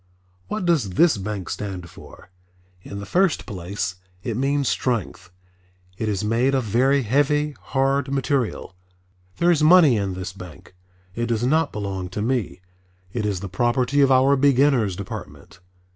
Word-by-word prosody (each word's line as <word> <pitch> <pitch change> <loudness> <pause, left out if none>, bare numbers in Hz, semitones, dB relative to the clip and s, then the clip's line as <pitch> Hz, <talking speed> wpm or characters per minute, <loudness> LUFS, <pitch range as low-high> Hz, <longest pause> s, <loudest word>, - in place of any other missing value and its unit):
What 210 -3 -3
does 135 - +1
this 170 - +5
bank 100 -2 -5
stand 95 -4 -5
for? 85 - -15 0.5
In 100 - -8
the 100 - -6
first 185 - +1
place 90 -2 -4 0.3
it 115 - -3
means 140 +2 0
Strength. 105 -7 -2 0.7
It 110 +3 -3
is 100 -1 -2
made 120 +5 +1
of 130 - +1
very 130 +6 +2
heavy, 145 +5 +1
hard 135 0 0
material. 135 -7 -1 0.6
There 175 +1 +3
is 160 -3 +2
money 155 -6 +6
in 100 -2 -2
this 95 +1 -6
bank. 90 -3 -12 0.4
It 120 +3 -2
does 115 0 0
not 155 +3 +2
belong 95 -3 -4
to 100 +3 -5
me, 120 -6 -2 0.5
it 110 -3 -1
is 95 -3 -2
the 100 - -5
property 120 +7 +1
of 135 -1 +4
our 135 +2 +5
Beginners' 135 -7 +3
Department. 90 -4 -9
120 Hz, 155 wpm, -22 LUFS, 100-140 Hz, 0.7 s, money